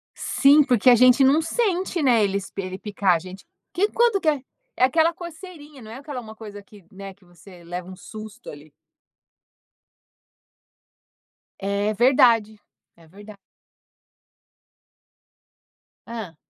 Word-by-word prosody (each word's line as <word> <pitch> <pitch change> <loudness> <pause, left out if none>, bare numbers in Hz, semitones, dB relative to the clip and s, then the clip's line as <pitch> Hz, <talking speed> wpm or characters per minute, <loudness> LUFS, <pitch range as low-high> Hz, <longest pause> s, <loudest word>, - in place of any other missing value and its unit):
Sim, 285 +2 +4
porque 250 -3 +3
a - - +7
gente 255 +3 +5
não 285 +4 +4
sente, 370 -2 -2
né, 245 -5 +3
ele 200 -1 0
se - - -12
ele 185 -1 -5
picar 200 -3 0
a - - 0
gente, 185 +3 -12 0.3
que 400 +4 +1
quanto 465 -3 +1
que 315 - -2
é 290 -3 +1 0.3
é 255 - +2
aquela 320 +5 +2
coceirinha, 320 -5 -12
não 220 - -12
é 230 - -9
aquela 280 -1 -8
uma 220 -1 -12
coisa 205 -2 -11
que 200 0 -18
né, 195 0 -10
que 195 -1 -28
você 175 +1 -17
leva 175 +1 -7
um 185 - -11
susto, 215 +4 -12
ali. 145 +1 -14 2.9
É 200 +2 -1
verdade, 230 -2 +3 0.4
é 165 -1 -20
verda 205 +5 -14 2.7
Hã. 220 -8 -8
220 Hz, 140 wpm, -22 LUFS, 195-285 Hz, 2.9 s, a